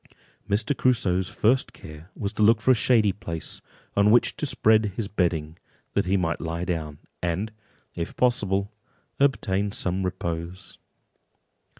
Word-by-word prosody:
Mr. 110 +7 +1
Crusoe's 95 -9 +1
first 125 +5 +1
care 80 +3 -12
was 100 0 -3
to 110 - -3
look 110 +1 +5
for 130 - +3
a - - +8
shady 110 -3 +3
place, 85 -5 -6 0.3
on 100 +1 +4
which 120 +3 +4
to 150 - -2
spread 110 -5 +3
his 110 -4 -2
bedding, 85 -5 -1 0.3
that - - 0
he 95 +1 +3
might 85 -3 -1
lie 85 +1 -3
down, 80 -4 -3 0.2
and, 90 +5 -1 0.4
if 85 - -5
possible, 100 -4 +1 0.5
obtain 105 -8 +1
some 95 0 -2
repose. 85 -1 -5
100 Hz, 140 wpm, -25 LUFS, 85-110 Hz, 0.5 s, a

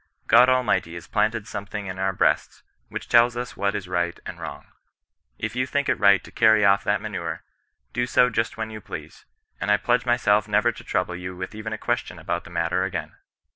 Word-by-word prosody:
God 125 +2 +6
Almighty 125 -9 +1
has 85 - -8
planted 110 0 0
something 100 0 -5
in 95 -1 -6
all 95 - 0
our 95 - +2
breasts 90 - 0 0.3
which - - -6
tells 120 0 +4
us 125 0 -5
what 100 0 0
is 100 -3 -4
right 85 -1 -1
and - - -7
wrong: - - -7 0.7
if - - -4
you 130 +1 0
think 140 +1 0
it 130 - +1
right 100 -2 +5
to - - -13
cany 110 -2 +4
off 100 0 +4
that - - +1
manure, - - -5 0.5
do 120 0 0
so 125 0 +4
just 115 +1 -1
when 110 0 -4
you 110 -1 -8
please; - - -9 0.3
and 90 - -2
I 105 - +5
pledge 120 +3 +1
myself 105 -4 +3
never 105 +3 +3
to 110 - -12
trouble 90 -1 -1
you 90 0 -6
with 90 +3 -6
even 110 +1 -6
a 110 - -3
question - - -2
about - - -3
the - - -11
matter 85 +1 0
again." 95 - -4
105 Hz, 215 wpm, -24 LUFS, 95-120 Hz, 0.7 s, God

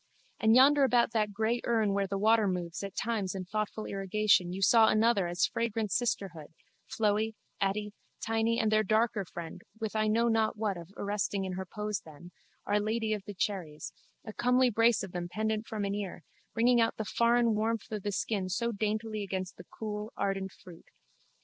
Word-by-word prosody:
And 220 +1 +4
yonder 280 +3 +6
about 245 -3 +3
that 215 -2 0
grey 220 +4 0
urn 220 -4 +1
where 200 0 0
the 195 +1 -2
water 220 +1 +4
moves 175 -2 -3
at 200 -1 -6
times 215 -5 -2
in 185 -1 -4
thoughtful 215 +2 -3
irrigation 195 -2 +2
you 185 - -5
saw 225 +1 +6
another 215 -3 +3
as 175 +1 +1
fragrant 225 -2 -2
sisterhood, 170 -9 -2 0.3
Floey, 220 0 0 0.2
Atty, 205 +1 -1 0.3
Tiny 225 +1 0
and 220 -2 +1
their 215 0 +4
darker 215 0 +1
friend 170 -1 -8 0.2
with 220 -1 -4
I 215 0 +2
know 230 +2 +2
not 225 -1 +1
what 210 -2 -1
of 170 -1 -9
arresting 200 -1 -1
in 185 - -4
her 190 0 -5
pose 210 +1 -3
then, 160 +3 -13 0.3
Our 205 +1 +2
Lady 220 +1 -1
of 205 -2 -4
the 205 - -8
Cherries, 180 -6 -3 0.3
a 215 - -7
comely 250 +1 +3
brace 230 +1 +3
of 195 - -7
them 175 -1 -4
pendent 220 +2 -2
from 210 -2 -3
an 200 - -2
ear, 195 -5 -5 0.3
bringing 240 +1 +4
out 225 - +1
the 220 - -3
foreign 235 +2 +3
warmth 220 +1 -1
of 215 -1 -3
the 205 - -2
skin 195 -1 -2
so 235 +6 -1
daintily 215 0 -2
against 190 -1 -4
the 180 - -11
cool 210 +1 -6
ardent 195 -1 -1
fruit. 175 -3 -15
210 Hz, 190 wpm, -30 LUFS, 195-225 Hz, 0.3 s, yonder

